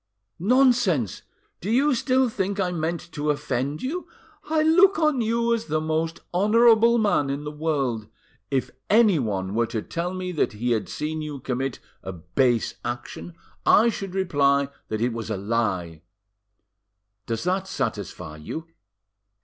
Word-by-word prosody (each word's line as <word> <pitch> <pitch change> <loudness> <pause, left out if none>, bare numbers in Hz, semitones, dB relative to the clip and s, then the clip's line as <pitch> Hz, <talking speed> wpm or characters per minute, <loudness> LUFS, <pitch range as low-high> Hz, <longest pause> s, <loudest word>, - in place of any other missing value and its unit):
"Nonsense! 225 - +3 0.4
Do 195 - -4
you 270 +6 +3
still 260 +1 +2
think 200 -2 -2
I 185 -2 +1
meant 170 +1 -3
to 150 0 -2
offend 140 0 -2
you? 330 +8 -3 0.4
I 315 -1 +2
look 365 +5 +5
on 305 -6 +2
you 230 +1 +1
as 230 -1 -2
the 155 0 0
most 160 +1 -2
honourable 230 +4 +5
man 205 -10 +2
in 140 +1 -3
the 150 - -5
world. 140 -8 -1 0.4
If 135 -2 -1 0.2
anyone 130 - +3
were 115 +1 +1
to 110 -2 -3
tell 175 +2 -3
me 185 0 -4
that 155 - 0
he 120 +4 -2
had 110 -3 0
seen 155 +1 -3
you 150 -2 -5
commit 130 0 -3 0.2
a 95 - -6
base 110 +8 0
action, 120 +7 -6 0.3
I 230 +3 +5
should 195 -4 -5
reply 140 -6 +2 0.2
that 110 0 -3
it 120 0 +1
was 115 -1 -5
a 110 - -1
lie. 95 -6 -2 1.3
Does 115 -1 -2
that 185 +2 0
satisfy 75 - -4
you?" 155 - -6
160 Hz, 150 wpm, -24 LUFS, -, 1.3 s, look